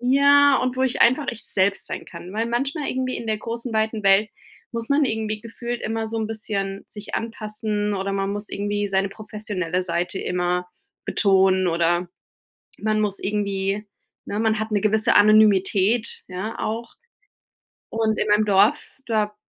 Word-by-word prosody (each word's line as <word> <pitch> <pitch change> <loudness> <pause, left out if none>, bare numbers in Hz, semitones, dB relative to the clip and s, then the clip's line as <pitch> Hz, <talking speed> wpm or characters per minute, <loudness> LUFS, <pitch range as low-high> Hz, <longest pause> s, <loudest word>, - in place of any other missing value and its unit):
Ja, 280 +2 +5
und 255 0 -1
wo 260 - +1
ich 260 -2 0
einfach 255 +5 +3
ich 230 - -9
selbst 195 +1 0
sein - - -6
kann, 180 - -10
weil 225 +1 0
manchmal 275 +5 -2
irgendwie 255 0 -2
in 230 - -7
der 215 -1 -1
großen 230 +2 -5
weiten 220 0 0
Welt 195 +2 +5 0.4
muss 230 -1 -4
man 285 +1 +3
irgendwie 220 -3 -2
gefühlt 235 +1 -5
immer 225 0 -2
so 225 - -4
'n 220 - -1
bisschen 200 -3 -4
sich 210 0 -8
anpassen, 215 -2 -3
oder 195 0 -2
man 195 0 -1
muss 205 +1 -5
irgendwie 205 0 -2
seine 195 0 +1
professionelle 200 -4 -4
Seite 175 +2 -2
immer 180 0 -1 0.4
betonen, 190 -2 +3
oder 170 +1 +1 0.7
man 215 0 +1
muss 205 -2 -1
irgendwie 200 0 -1 0.4
ne, 205 - -3
man 220 -1 +2
hat 220 0 -3
'ne 205 -2 +1
gewisse 215 +1 +2
Anonymität 210 +1 +4
ja 190 +5 -5
auch. 230 +2 -4 1.0
Und 220 -1 0
in - - 0
meinem 210 +1 +3
Dorf, 200 +2 +3
da 210 -2 0
215 Hz, 165 wpm, -23 LUFS, 195-225 Hz, 1.0 s, Ja